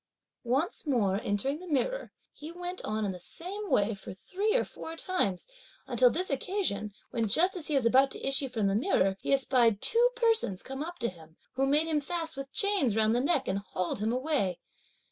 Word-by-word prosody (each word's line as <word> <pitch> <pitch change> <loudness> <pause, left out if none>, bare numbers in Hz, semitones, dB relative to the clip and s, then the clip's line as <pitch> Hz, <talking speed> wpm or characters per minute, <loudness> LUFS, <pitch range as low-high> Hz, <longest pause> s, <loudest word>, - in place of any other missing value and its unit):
Once 290 +5 0
more 210 -7 +1
entering 265 +9 -1
the 365 - -10
mirror, 355 - -1 0.2
he 305 +2 -9
went 355 +1 -6
on 215 0 -1
in 200 - -1
the 180 - -8
same 390 - -6
way 205 +2 +3
for 195 -2 -9
three 405 - -1
or - - +3
four 325 - -8
times, 320 - -1 0.4
until - - +4
this 370 -6 -1
occasion, 275 - -1 0.2
when 230 -2 0
just 345 - +3
as 335 -5 -5
he 300 - 0
was 265 -4 +2
about 265 +4 +5
to - - -5
issue 270 0 +1
from 225 -4 -1
the 195 - +2
mirror, 200 - +2
he - - -2
espied 250 -6 +4
two 475 - +3
persons 455 - +1
come 270 +1 -6
up 345 +3 -5
to 235 - -1
him, 165 -4 -11 0.2
who 270 +1 +1
made 295 +3 +3
him 310 -2 0
fast 325 +1 -3
with 275 0 -7
chains 395 - +1
round 220 0 +3
the 245 - +2
neck, 280 -1 +1
and 190 +1 0
hauled 185 -1 -3
him 215 +2 0
away. 255 - 0
270 Hz, 205 wpm, -30 LUFS, 210-350 Hz, 0.4 s, about